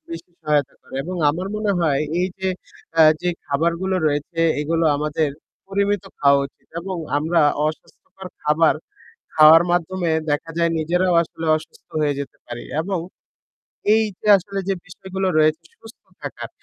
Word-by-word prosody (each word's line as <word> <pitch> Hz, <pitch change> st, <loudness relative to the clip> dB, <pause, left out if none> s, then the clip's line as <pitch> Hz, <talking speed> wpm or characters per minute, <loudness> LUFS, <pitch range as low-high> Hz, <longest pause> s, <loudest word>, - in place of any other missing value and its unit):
বেশ 165 Hz, 0 st, -6 dB, 0.2 s
সহায়তা 150 Hz, -3 st, +1 dB
করে -, -, -14 dB
এবং 180 Hz, +1 st, -5 dB
আমার 180 Hz, +5 st, -4 dB
মনে 210 Hz, -1 st, 0 dB
হয় 145 Hz, -4 st, +2 dB, 0.2 s
এই 185 Hz, -, +1 dB
যে 190 Hz, 0 st, -1 dB, 0.5 s
আ -, -, +10 dB, 0.2 s
যে 180 Hz, -, 0 dB, 0.2 s
খাবারগুলো 170 Hz, +6 st, 0 dB
রয়েছে 150 Hz, +3 st, -1 dB, 0.2 s
এগুলো 165 Hz, +2 st, 0 dB
আমাদের 150 Hz, 0 st, -1 dB, 0.4 s
পরিমিত 200 Hz, 0 st, 0 dB, 0.2 s
খাওয়া 140 Hz, 0 st, +5 dB
উচিত 140 Hz, -, -28 dB
এবং 190 Hz, +1 st, -5 dB, 0.2 s
আমরা 165 Hz, +3 st, +1 dB, 0.3 s
অস্বাস্থ্যকর 180 Hz, +4 st, -8 dB
খাবার 150 Hz, +2 st, +3 dB, 0.6 s
খাওয়ার 155 Hz, +1 st, +8 dB
মাধ্যমে 175 Hz, 0 st, 0 dB, 0.2 s
দেখা 145 Hz, +3 st, -1 dB
যায় 170 Hz, 0 st, +2 dB
নিজেরাও 175 Hz, +3 st, +1 dB
আসলে 165 Hz, 0 st, -7 dB
অসুস্থ 155 Hz, +1 st, -12 dB
হয়ে 145 Hz, -2 st, +1 dB
যেতে 140 Hz, -, -7 dB
পারি 120 Hz, 0 st, -7 dB, 0.2 s
এবং 190 Hz, +3 st, -2 dB, 1.0 s
এই 220 Hz, -, +4 dB, 0.2 s
যে 210 Hz, -, -6 dB
আসলে 195 Hz, +1 st, -5 dB
যে -, -, +3 dB
বিষয়গুলো 190 Hz, +1 st, -4 dB
রয়েছে 155 Hz, +2 st, +2 dB
সুস্থ 225 Hz, +1 st, -15 dB, 0.2 s
থাকার, -, -, -6 dB
165 Hz, 150 wpm, -21 LUFS, 155-190 Hz, 1.0 s, আ